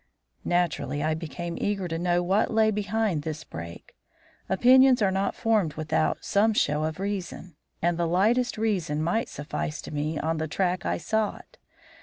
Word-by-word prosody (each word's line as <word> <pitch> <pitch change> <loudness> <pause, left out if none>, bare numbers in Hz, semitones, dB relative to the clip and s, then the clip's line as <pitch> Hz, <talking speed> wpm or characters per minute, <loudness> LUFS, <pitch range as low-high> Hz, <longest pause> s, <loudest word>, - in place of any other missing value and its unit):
Naturally, 155 -5 0
I 155 0 +1
became 165 +2 -5
eager 200 -3 -1
to 165 -1 -3
know 175 0 +1
what 195 +5 +2
lay 220 -1 +3
behind 210 -4 -1
this 155 0 -5
break. 85 +1 -9 0.5
Opinions 255 +6 +6
are 195 - +3
not 195 +1 -1
formed 215 -10 +1
without 155 0 -1
some 220 +2 +3
show 150 -5 +1
of 155 +2 -4
reason, 190 -4 -5 0.3
and 170 0 +1
the 170 - +1
lightest 225 +9 +2
reason 180 -9 0
might 200 +8 0
suffice 150 +1 -4
to - - -8
put - - -6
me 155 +2 -2
on 160 +2 -1
the 160 - -2
track 180 +3 -1
I - - 0
sought. 220 - -3
175 Hz, 170 wpm, -26 LUFS, 155-210 Hz, 0.5 s, Opinions